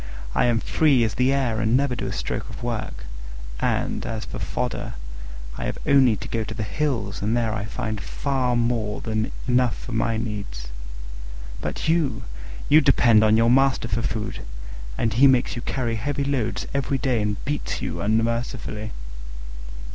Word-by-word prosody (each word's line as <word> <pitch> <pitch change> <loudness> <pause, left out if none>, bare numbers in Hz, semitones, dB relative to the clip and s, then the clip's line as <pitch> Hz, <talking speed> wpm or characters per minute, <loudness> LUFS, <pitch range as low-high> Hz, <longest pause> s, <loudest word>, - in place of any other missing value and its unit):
I - - +3
am 120 -2 +3
free 140 -2 +3
as 110 -2 0
the 125 +1 +2
air, 125 -5 +1
and 110 +3 +3
never 140 -2 +1
do - - -3
a - - -3
stroke - - -3
of - - -8
work; 110 - -3 0.6
and, - - 0
as 110 0 -4
for - - -6
fodder, 120 +4 -3 0.6
I - - -3
have - - -3
only 135 -5 +5
to - - -7
go 115 -1 -1
to 110 - -6
the 110 - -3
hills 115 -3 -2
and 110 +4 +1
there 115 -2 0
I 105 -2 -2
find 110 0 -4
far 130 0 0
more 115 -3 0
than 110 -1 -1 0.2
enough 125 -1 +3
for 125 - -8
my 115 0 +1
needs. 100 - -5 0.9
But - - -3
you! 160 -8 +1 0.4
you 155 +2 +7
depend 120 -6 +5
on 110 0 +5
your 115 +1 +4
master 135 -2 +3
for 115 0 -1
food, 110 0 -3 0.6
and 115 -2 +1
he 130 +6 +6
makes 130 -1 +3
you 120 - -4
carry 120 -2 -1
heavy 140 +6 -1
loads 135 -5 -1
every 140 0 0
day 125 -3 +1
and 105 -1 -1
beats 145 +2 -2
you - - -3
unmercifully." 110 0 -1
115 Hz, 175 wpm, -24 LUFS, 110-130 Hz, 0.9 s, you